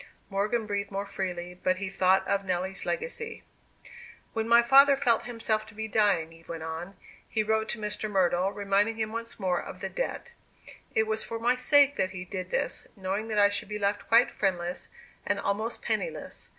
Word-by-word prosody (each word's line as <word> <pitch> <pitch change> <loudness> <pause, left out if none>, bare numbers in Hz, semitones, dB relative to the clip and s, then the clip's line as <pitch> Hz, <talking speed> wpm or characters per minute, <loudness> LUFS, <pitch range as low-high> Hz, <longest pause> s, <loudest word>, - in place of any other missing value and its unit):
Morgan 210 +4 0
breathed 200 -1 -2
more 200 0 -3
freely; 180 -2 -5
but 185 - +3
he 200 0 -3
thought 190 0 +2
of 200 0 +1
Nelly's 185 +1 -1
legacy. 465 -1 -3 0.9
"When 225 0 -1
my 235 0 +7
father 275 +3 +7
felt 240 -4 +2
himself 225 -2 -1
to - - -14
be 220 +1 -4
dying," 200 -7 +2
Eve 165 0 -18
went 165 -1 -5
on, 165 +4 -6 0.3
"he 220 - +1
wrote 220 0 0
to - - -2
Mr. 210 0 -2
Myrtle, 185 -1 +2
reminding 205 +2 +1
him 220 -1 -2
once 230 0 -5
more 185 -3 0
of - - -9
the - - -4
debt. - - -4 0.6
It 220 - +4
was 220 0 0
for 230 - -4
my 240 +2 +2
sake 285 +2 +5
that 185 - +1
he 185 -1 -7
did 185 -1 -5
this, - - -2
knowing 195 +3 -3
that 215 -2 -2
I 205 0 +6
should 205 - -4
be 210 - -3
left 200 0 -1
quite 230 +2 +5
friendless, 180 -3 -2 0.3
and 205 - 0
almost 215 +4 -2
penniless. - - -3
205 Hz, 190 wpm, -28 LUFS, 190-225 Hz, 0.9 s, my